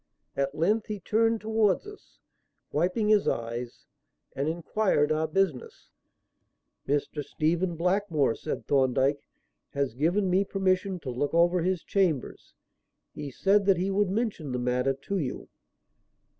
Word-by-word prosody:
At 140 +1 -1
length 210 +7 +1
he 210 -1 -4
turned 225 +4 +1
towards 220 - +1
us, 415 0 -13 0.5
wiping 185 +7 +1
his 210 -2 +4
eyes, 120 +1 -3 0.5
and 140 +3 -1
inquired 170 -2 +1
our 155 +1 +1
business. 155 -5 -2 1.0
"Mr. 145 +1 -1
Stephen 170 +5 -1
Blackmore," 170 - +1
said 155 - -5
Thorndyke, 135 +1 +2 0.5
"has 140 -4 -1
given 175 - +1
me 185 +2 +3
permission 190 -1 0
to 130 - -5
look 145 +6 -2
over 175 +1 +4
his 180 0 -1
chambers. 175 - -1 0.6
He 145 -1 -6
said 195 +8 +2
that 195 -3 +5
he 190 +3 -1
would 200 0 +1
mention 200 - -2
the - - -1
matter 125 +2 +1
to 190 +9 -3
you." 135 -6 -4
170 Hz, 135 wpm, -27 LUFS, 140-195 Hz, 1.0 s, that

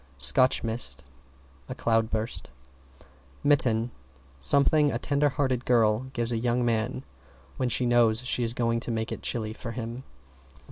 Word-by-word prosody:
=SCOTCH 70 - +4
MIST= 75 - -4 0.7
A - - -5
cloudburst. 115 0 -1 0.9
=MITTEN= 125 -5 +2 0.5
Something 140 - +4
a 115 - -1
tender 145 +4 +1
hearted 130 -3 -1
girl 115 0 +2
gives 120 -1 0
a 115 - -1
young 120 +1 0
man 120 +3 -1 0.5
when 130 -1 0
she 125 - +1
knows 120 -2 +3
she 125 - 0
is 115 0 -1
going 115 -1 0
to 115 - -7
make 110 -1 -2
it - - -5
chilly 110 -2 -3
for 115 +1 -7
him. 120 +1 -6
120 Hz, 145 wpm, -27 LUFS, 110-125 Hz, 0.9 s, =SCOTCH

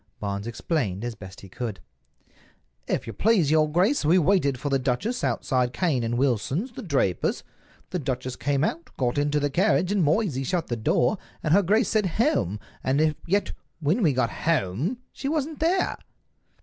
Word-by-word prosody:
Barnes 100 +1 -3
explained 115 - -2
as 120 - -3
best 95 -3 -11
he 100 - -11
could. 110 0 -5 1.1
"If - - -1
you 115 - -6
please, 185 - +3
your 155 -1 +3
grace, 190 - +2
we 160 +5 +4
waited 160 -7 +2
for 145 - -2
the 135 - +3
duchess 140 - -1
outside 125 -2 0
Cane 155 -10 +1
and 115 +1 -1
Wilson's, 140 - 0
the - - -8
drapers. 135 - 0 0.5
The 180 - -1
duchess 130 -2 -3
came 140 0 0
out, 170 +1 -2
got 125 +1 0
into 145 0 +1
the 145 -1 -1
carriage, 185 +2 +2
and 200 -3 +2
Moysey 155 - +1
shut 170 +4 -1
the 120 - 0
door, 120 - +1 0.2
and 155 - +2
her 200 - +6
grace 210 +4 +2
said, 215 -3 +2
'Home!' 160 - +1 0.2
and 150 +4 +2
yet 200 +4 +1 0.3
when 165 +9 +1
we 165 -7 +4
got 125 -3 0
home 155 - 0 0.2
she 275 - -4
wasn't 310 0 -2
there." 355 +4 +1
150 Hz, 175 wpm, -25 LUFS, 125-190 Hz, 1.1 s, her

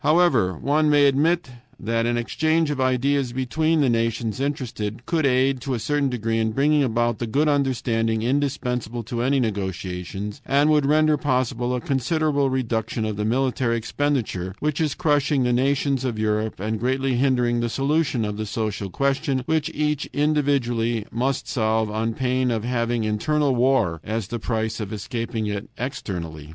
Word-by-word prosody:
"However, 145 - +3
one 150 - +2
may 145 -1 +5
admit 155 +5 +2 0.3
that 115 +2 0
an 120 0 +1
exchange 155 +6 +1
of 140 -2 -2
ideas 130 0 +1
between 155 +5 +1
the 140 - +3
nations 115 0 -1
interested 125 -5 -3
could 160 -4 +1
aid, 130 0 +2
to 130 +1 -2
a - - -3
certain 140 +4 0
degree, 115 -2 -1
in 110 -1 0
bringing 145 +4 +3
about 120 -2 0
the 120 - -2
good 145 +7 +1
understanding 115 -6 +1
indispensable 125 -3 -1
to 115 +1 -3
any 135 +3 +2
negotiations, 95 0 -4
and 145 +3 +3
would 150 -2 +3
render 155 +1 +4
possible 125 -3 0
a - - -1
considerable 140 +2 0
reduction 115 -3 -1
of 110 -1 -2
the 105 +1 -2
military 125 0 +1
expenditure 115 -7 -2
which 150 0 -1
is 150 -4 0
crushing 145 -4 +2
the 125 0 +2
nations 135 +1 +1
of 120 -4 -2
Europe 110 -1 -1
and 110 +2 -2
greatly 130 +2 0
hindering 125 -2 +2
the 120 0 -1
solution 140 -2 0
of 105 0 -4
the 110 0 -3
social 105 -2 -3
question, 140 - 0
which 160 0 0
each 150 -1 -1
individually 130 -7 +1
must 130 +3 -1
solve 110 -2 0
on 110 +1 -1
pain 130 0 0
of 115 -3 -1
having 120 -1 0
internal 140 +7 +1
war 120 -10 +2
as 110 -2 -3
the 120 - -3
price 110 -1 -2
for 105 -3 -5
escaping 115 +1 -3
it 105 0 -4
externally. 85 - -5
125 Hz, 165 wpm, -23 LUFS, 110-140 Hz, 0.3 s, may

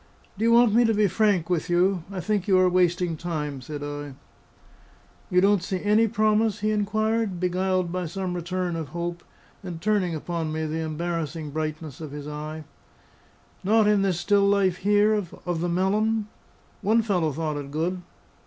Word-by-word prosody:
"Do 210 - -4
you 230 - +4
want 235 -2 +5
me 240 +2 +5
to 225 -1 +2
be 210 0 +3
frank 200 -3 +2
with 175 -2 -1
you? 180 0 +2
I 190 -2 -4
think 210 0 -1
you 190 -2 +4
are 185 0 +5
wasting 180 -1 +2
time," 150 -5 -4
said 145 +3 -6
I. 145 -1 -6 1.1
"You 180 0 +3
don't 200 -1 +4
see 185 +1 -3
any 210 +2 +4
promise?" 215 -1 +1
he 215 +1 +1
inquired, 215 -1 0
beguiled 185 0 0
by 180 -1 -2
some 185 +2 -3
return 180 0 -2
of 160 -2 -4
hope, 170 0 -4 0.4
and 180 -4 -7
turning 190 -3 +1
upon 165 0 -3
me 160 0 -2
the 155 +1 -3
embarrassing 160 -1 -3
brightness 155 -1 -4
of 155 - -6
his 145 0 -7
eye. 155 +1 -6 1.0
"Not 215 +2 +4
in 210 -1 +4
this 190 -3 0
still 200 +2 +3
life 195 -3 +2
here, 205 +3 +3
of 175 -4 -3
the 175 - 0
melon? 210 +4 +1 0.5
One 220 +3 +3
fellow 180 -7 +1
thought 155 0 -3
it 140 -1 -6
good." 170 +5 -2
180 Hz, 175 wpm, -25 LUFS, 160-205 Hz, 1.1 s, want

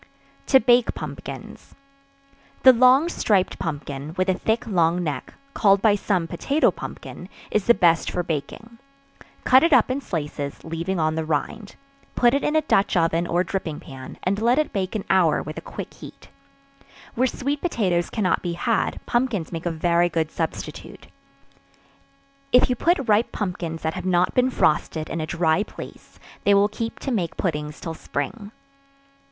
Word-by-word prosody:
To 265 - +6
Bake 240 0 +3
Pumpkins. - - -8 0.9
The 260 - +9
long 255 +6 +5
striped 205 - 0
pumpkin, 145 -1 -5
with 185 +1 +1
a - - +4
thick 220 +6 -1
long 175 -4 +1
neck, 145 -5 -5 0.2
called 200 -2 +4
by 210 +1 +4
some 195 -4 0
potato 285 - +1
pumpkin, - - -9 0.2
is 210 -2 +1
the 235 - +6
best 170 -4 +3
for 180 - -2
baking; 175 +10 -5 0.6
cut 260 0 +6
it 330 -1 +3
up 260 - +5
in 270 +2 -2
slices, 150 - -5
leaving 165 +3 -3
on 155 0 +1
the 160 0 -2
rind; 160 +7 -3 0.4
put 240 0 +4
it 280 - +1
in 300 - 0
a 315 - +4
dutch 195 -8 +2
oven 165 0 +1
or 175 +2 +1
dripping 180 -6 -4
pan, 130 -3 -10
and 200 +3 0
let 240 +3 +3
it 305 - 0
bake 190 0 -2
an 210 - -2
hour 175 -5 +3
with 155 +1 -6
a - - -12
quick - - -8
heat. - - -13 0.8
Where 255 +2 +2
sweet 280 +3 -3
potatoes 185 - 0
cannot 205 -5 0
be 175 -1 -3
had, 230 +4 -1
pumpkins 240 -8 -1
make 165 0 -4
a - - +2
very 170 +1 +1
good 160 -1 -1
substitute. 165 -1 -6 1.4
If 250 0 +5
you - - +1
put 285 -1 +1
ripe 215 +2 +3
pumpkins 175 -5 -4
that 160 0 -1
have - - -5
not 180 0 +2
been 250 0 +3
frosted; 155 -7 0
in 165 - -2
a 155 - -4
dry 165 +2 +1
place, - - -10 0.3
they 200 - +4
will 200 +1 +4
keep 225 +2 -5
to 270 - -3
make 185 -8 -2
puddings 150 -4 -3
till 165 - -5
spring. 200 - -5
185 Hz, 170 wpm, -23 LUFS, 165-235 Hz, 1.4 s, The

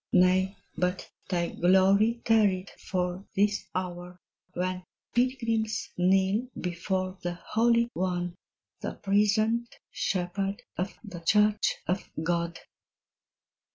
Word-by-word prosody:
Nay, 185 +2 +4 0.2
but 180 +1 -1 0.2
thy 175 -2 0
glory 195 +6 +4
tarried 200 -4 +3
for 180 0 -3
this 205 +1 +1
hour, 180 -1 -4 0.4
When 185 +1 -2 0.3
pilgrims 230 -3 0
kneel 190 +6 +2
before 185 +1 -2
the 175 0 -3
Holy 235 +5 +2
One, 180 -1 -1 0.5
The - - -4
prisoned 215 +4 +1
shepherd 195 +2 -2
of 185 +3 -3
the 195 -6 -8
Church 210 +4 +3
of 185 +3 -2
God. 170 0 -1
190 Hz, 100 wpm, -28 LUFS, 180-210 Hz, 0.5 s, Nay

